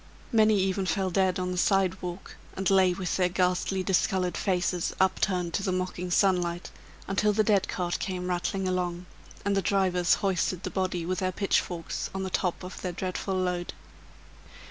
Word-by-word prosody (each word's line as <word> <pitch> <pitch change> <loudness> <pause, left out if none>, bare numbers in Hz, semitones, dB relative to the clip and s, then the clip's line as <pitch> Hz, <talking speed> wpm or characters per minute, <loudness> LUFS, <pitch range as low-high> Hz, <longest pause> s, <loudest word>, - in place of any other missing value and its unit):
Many 215 -2 +5
even 190 0 0
fell 185 +2 0
dead 190 0 +2
on 180 0 -2
the 180 - -1
sidewalk, 185 -1 0 0.2
and 190 0 -1
lay 190 -1 +5
with 180 -1 -2
their 180 -1 +2
ghastly, 180 +1 0
discolored 185 -1 +1
faces, 180 -2 0
upturned 185 -2 +1
to - - 0
the 195 - -1
mocking 180 0 -3
sunlight, 175 -2 +1 0.4
until 205 +2 +2
the 215 +1 +3
dead 205 -2 +2
cart 175 -2 -2
came 180 -2 -3
rattling 185 +2 -1
along, 180 -1 -2 0.4
and 200 0 +2
the 195 - +2
drivers 185 -2 +2
hoisted 185 -2 -1
the - - -3
body 185 -3 -1
with 185 +1 -1
their 185 -1 0
pitchforks 175 -3 -1
on 190 - -2
the 190 - -4
top 180 0 -1
of 180 +1 -8
their 180 -2 -3
dreadful 190 +2 -3
load. 180 -1 -1
185 Hz, 170 wpm, -28 LUFS, 180-195 Hz, 0.4 s, Many